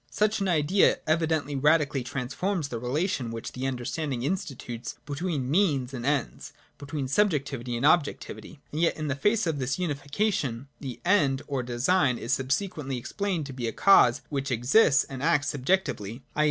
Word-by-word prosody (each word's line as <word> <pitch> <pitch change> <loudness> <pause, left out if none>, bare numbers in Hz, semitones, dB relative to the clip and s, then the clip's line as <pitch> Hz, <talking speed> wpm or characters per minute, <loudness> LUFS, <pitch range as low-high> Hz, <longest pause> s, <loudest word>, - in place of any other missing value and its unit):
58.] - - -17
Such 215 0 +2
an 195 - +1
Idea 175 +3 +3
evidently 155 -2 0
radically 145 -1 +2
transforms 145 +7 -2
the 115 - -4
relation 130 - -1
which 115 0 -6
the 130 +1 -3
understanding 130 +1 -3
institutes 130 -8 -4
between 145 -2 -2
means 145 -8 +2
and 125 0 -4
ends, 145 -3 -2 0.3
between 140 -1 -4
subjectivity 140 - 0
and 125 - -1
objectivity. 155 0 0
And 155 - -2
yet 170 - +2
in 155 -1 -3
the 135 - 0
face 205 +8 +1
of 160 -4 -1
this 130 0 -1
unification, 145 - -1
the 130 -4 -6
End 145 -8 +3
or 140 -3 -2
design 125 +3 +1
is 120 - -2
subsequently 140 0 -1
explained 180 - -2
to 135 - -7
be 125 -2 -3
a - - -1
cause 125 - +5
which 140 -1 -2
exists 130 - +4
and 135 -2 -8
acts 145 -2 +2
subjectively, 130 - -1
i. - - -3
140 Hz, 165 wpm, -27 LUFS, 130-165 Hz, 0.3 s, cause